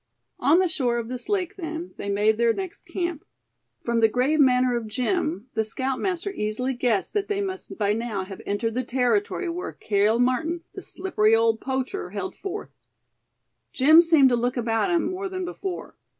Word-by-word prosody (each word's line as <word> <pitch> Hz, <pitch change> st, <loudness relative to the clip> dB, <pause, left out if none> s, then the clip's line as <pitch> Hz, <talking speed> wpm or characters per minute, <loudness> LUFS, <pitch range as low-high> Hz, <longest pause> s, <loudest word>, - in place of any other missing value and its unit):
On 310 Hz, +4 st, +4 dB
the 370 Hz, 0 st, +3 dB
shore 255 Hz, -7 st, 0 dB
of 235 Hz, -1 st, -4 dB
this 255 Hz, +7 st, -6 dB
lake 400 Hz, -1 st, -1 dB
then, 330 Hz, 0 st, -5 dB
they 200 Hz, -, -4 dB
made 210 Hz, +2 st, +2 dB
their 235 Hz, -1 st, +4 dB
next 375 Hz, +2 st, -7 dB
camp. 345 Hz, -3 st, -3 dB, 0.6 s
From 235 Hz, -1 st, +1 dB
the 225 Hz, -, +6 dB
grave 260 Hz, +7 st, +1 dB
manner 250 Hz, -2 st, +4 dB
of 235 Hz, -2 st, -3 dB
Jim, 255 Hz, -, -1 dB
the 220 Hz, -, +1 dB
scoutmaster 270 Hz, -, -2 dB
easily 250 Hz, -, -2 dB
guessed 240 Hz, -5 st, 0 dB
that 410 Hz, -1 st, 0 dB
they 410 Hz, -1 st, -1 dB
must 380 Hz, -1 st, -5 dB
by 205 Hz, -1 st, +1 dB
now 220 Hz, -3 st, -2 dB
have 190 Hz, 0 st, -9 dB
entered 220 Hz, +3 st, -1 dB
the 255 Hz, +2 st, -1 dB
territory 245 Hz, -, 0 dB
where 345 Hz, +1 st, -4 dB
Cale 210 Hz, +2 st, +1 dB
Martin, 315 Hz, +8 st, 0 dB
the -, -, -7 dB
slippery 225 Hz, -, +1 dB
old 225 Hz, 0 st, +2 dB
poacher, 265 Hz, +8 st, -3 dB
held -, -, -5 dB
forth. 400 Hz, +1 st, -6 dB, 1.0 s
Jim 310 Hz, +5 st, +7 dB
seemed 320 Hz, -6 st, +5 dB
to 245 Hz, -, +3 dB
look 245 Hz, +2 st, -1 dB
about 230 Hz, +6 st, +1 dB
him 345 Hz, -2 st, +2 dB
more 380 Hz, +1 st, -4 dB
than 370 Hz, -1 st, -4 dB
before. 365 Hz, +1 st, -6 dB
255 Hz, 180 wpm, -25 LUFS, 225-350 Hz, 1.0 s, Jim